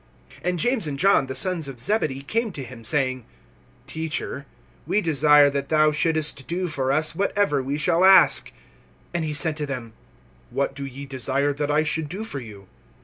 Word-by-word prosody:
(35)And 180 +1 0
James 230 0 0
and 140 -2 -4
John, 185 -5 +3
the 130 - -5
sons 170 0 0
of 135 -3 -9
Zebedee, 140 - -1
come 225 +8 -2
to 140 - -6
him 125 -2 -11
saying: 130 0 0 0.6
Teacher, 145 -3 -4 0.4
we 210 - +1
desire 150 -4 +5
that 140 0 -4
thou 155 -1 +3
shouldst 155 -3 0
do 180 +2 -2
for 135 -5 -2
us 155 +3 +1
whatever 200 -6 0
we 135 +3 -3
shall 170 +3 +1
ask. 190 -2 +6 0.6
(36)And 170 -1 -1
he 155 - -3
said 155 +1 +4
to 150 -2 -4
them: 125 -5 -6 0.6
What 135 +2 -2
do 140 0 -6
ye 135 +2 -9
desire 135 +1 -1
that 145 +1 -3
I 150 +1 +2
should 155 -1 -1
do 195 +7 -5
for 145 -11 -5
you? 105 -5 -12
150 Hz, 185 wpm, -23 LUFS, 135-165 Hz, 0.6 s, ask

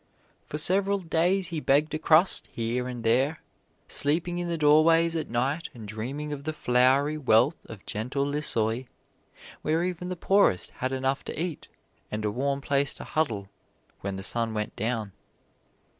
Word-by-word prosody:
For 150 - -4
several 195 +5 +2
days 180 +2 +1
he 165 -3 -2
begged 150 +2 +2
a 155 - -1
crust 160 +4 +3
here 120 +2 -2
and 120 -2 -6
there, 130 +7 +1 0.4
sleeping 175 +4 0
in 175 - -3
the 170 -1 -1
doorways 165 +2 +4
at 160 - -2
night 135 +7 -1
and 110 -3 -9
dreaming 135 +8 -4
of 140 -1 -7
the 155 +1 -3
flowery 135 +3 +2
wealth 125 +2 +3
of 110 -4 -11
gentle 125 +6 -2
Lissoy, 125 -5 +1 0.7
where 160 +3 +1
even 180 0 -3
the 180 - -3
poorest 195 - +2
had 130 +1 0
enough 135 +1 -1
to - - -5
eat 170 -2 -3 0.4
and 105 0 -3
a 105 - 0
warm 140 +4 -1
place 140 -1 +1
to - - -8
huddle 115 -11 -1 0.5
when 100 0 -4
the 95 - -6
sun 115 +1 -1
went 105 0 -3
down. 110 -1 -2
140 Hz, 165 wpm, -27 LUFS, 120-160 Hz, 0.7 s, doorways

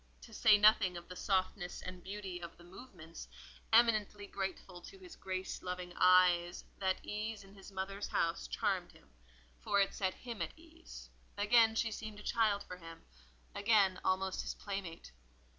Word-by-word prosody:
To 225 - -13
say 215 -1 +6
nothing 205 -4 +5
of 175 - -10
the 180 - -7
softness 185 -1 -1
and 185 -1 -8
beauty 195 -2 -6
of 170 -1 -9
the 175 - -16
movements, 175 -4 -11 0.4
eminently 215 -3 +3
grateful 190 -2 -5
to 390 - -12
his 370 -3 -12
grace 185 0 -4
loving 180 -1 -5
eye, 180 -1 +5 0.3
that 190 -1 -1
ease 215 0 -4
in 195 0 -16
his 200 0 -13
mother's 195 +1 -4
house 165 - -1
charmed - - -1
him, 70 - -21 0.5
for 200 - +1
it 195 - +2
set 190 -2 -1
him 235 -3 -7
at - - -4
ease: 330 +1 -13 0.3
again 220 +2 +5
she 225 0 0
seemed 215 -1 -7
a - - -11
child 215 -3 +1
for 180 - -9
him—again, 165 - -1
almost 190 0 0
his - - -5
playmate. 195 - -6
195 Hz, 160 wpm, -34 LUFS, 180-210 Hz, 0.5 s, say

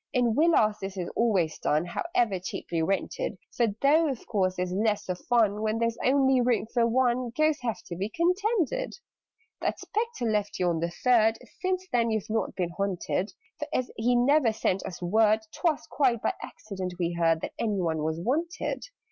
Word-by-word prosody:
"In 245 -3 +2
Villas 275 -9 +3
this 195 0 -5
is 180 -2 -3
always 190 -9 +1
done 155 +3 +1
However 220 - 0
cheaply 170 -2 -3
rented: 195 +3 -1 0.2
For, 235 - +3 0.2
though 310 +3 +5
of 260 -4 -5
course 185 -4 0
there's 180 0 -2
less 210 +1 0
of 180 -1 -2
fun 215 -4 +3
When 220 0 0
there 230 0 +2
is 230 - -9
only 265 -1 +4
room 240 -3 +2
for 235 -1 +3
one, 245 0 +1
Ghosts 310 -2 +2
have 235 -3 -3
to 170 - -6
be 195 +4 -3
contented. 400 - 0 0.7
"That - - -1
Spectre 440 - -3
left 210 -2 0
you 180 -1 +1
on 165 -1 0
the 170 +1 -1
Third 225 +3 +3 0.2
Since 370 0 -1
then 235 -1 +2
you've 220 -1 -2
not 225 - -1
been 175 -2 -2
haunted: 195 +1 -2 0.3
For, - - -3
as 255 - -1
he 245 +3 +2
never 255 0 +4
sent 195 -3 -1
us 180 -1 -8
word, 215 +4 +3
'Twas 330 -5 0
quite 255 -5 +1
by - - +1
accident 190 -4 -6
we 175 -1 -1
heard 165 -1 +2
That - - -5
any 210 -4 0
one 160 -3 0
was 160 +1 -1
wanted. 305 - -2
220 Hz, 190 wpm, -27 LUFS, 185-255 Hz, 0.7 s, though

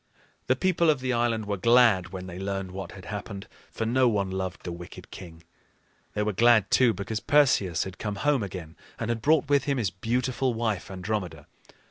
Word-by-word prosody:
The 130 - +3
people 170 +1 +2
of 150 -3 +3
the 130 0 -1
island 115 -2 0
were 100 -1 -2
glad 115 -4 +4
when 95 0 -7
they 90 0 -8
learned 95 -1 -3
what 95 +1 -7
had 95 -1 -11
happened, 100 -1 -6 0.2
for 115 - -4
no 125 +3 +3
one 100 -4 -1
loved 95 -1 -4
the 90 - -5
wicked 85 0 -10
king. 85 -3 -11 0.7
They 105 - +1
were 105 0 -1
glad, 110 -1 +4
too, 125 -2 +5
because 105 +1 -4
Perseus 130 - +3
had 95 -1 -9
come 105 -2 -3
home 145 +4 +1
again, 90 -5 -6 0.2
and 115 - -3
had 115 -1 -1
brought 150 +2 +3
with 140 -1 +2
him 140 -2 0
his 105 -7 0
beautiful 125 +4 -1
wife, 110 -5 -2
Andromeda. 90 -5 -4
105 Hz, 195 wpm, -27 LUFS, 95-125 Hz, 0.7 s, too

